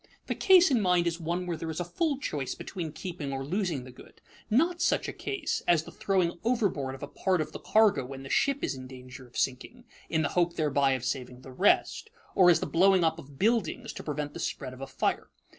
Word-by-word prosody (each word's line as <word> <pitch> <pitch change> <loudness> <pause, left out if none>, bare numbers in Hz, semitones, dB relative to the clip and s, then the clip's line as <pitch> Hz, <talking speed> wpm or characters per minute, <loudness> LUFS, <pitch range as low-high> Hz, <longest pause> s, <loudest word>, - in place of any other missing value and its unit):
_ - - -40 0.2
The - - -1
case 365 -4 +6
in 240 -4 +3
mind 180 -2 +3
is 170 0 -1
one 175 +2 -2
where 175 -1 -2
there 160 +1 -5
is 160 - -4
full 280 - -1
choice 145 - -3
between 165 -4 -6
keeping 165 -3 -6
or 135 0 -4
losing 175 -4 -1
the 130 - -11
good, 125 - -16 0.3
not 335 +10 +2
such - - +1
a - - -4
case 400 -7 -3
as 170 -3 +4
the - - -11
throwing 180 -3 0
overboard 200 - 0
of 135 - -11
a - - -4
part 185 +5 0
of 155 - -2
the - - -7
cargo 215 -10 +3
when 135 +1 -8
the 135 - -9
ship 280 0 +1
is - - 0
in 130 -1 -8
danger 130 0 -11
of 120 - -12
sinking, 135 - -2 0.3
in 160 -1 +1
the 140 - 0
hope 175 -1 +1
thereby 140 -3 +2
of 130 -2 -3
saving 125 -1 -4
the 130 - -11
rest, 205 - +2 0.2
or 180 -2 +6
as 170 - +4
the - - -1
blowing 185 +1 +4
up 160 0 +1
of 140 -3 -13
buildings 220 - 0
to - - -7
prevent 150 -1 -4
the - - -7
spread 130 - -4
of 130 - -12
a 135 - -5
fire. 130 - -1
165 Hz, 240 wpm, -29 LUFS, 135-195 Hz, 0.3 s, case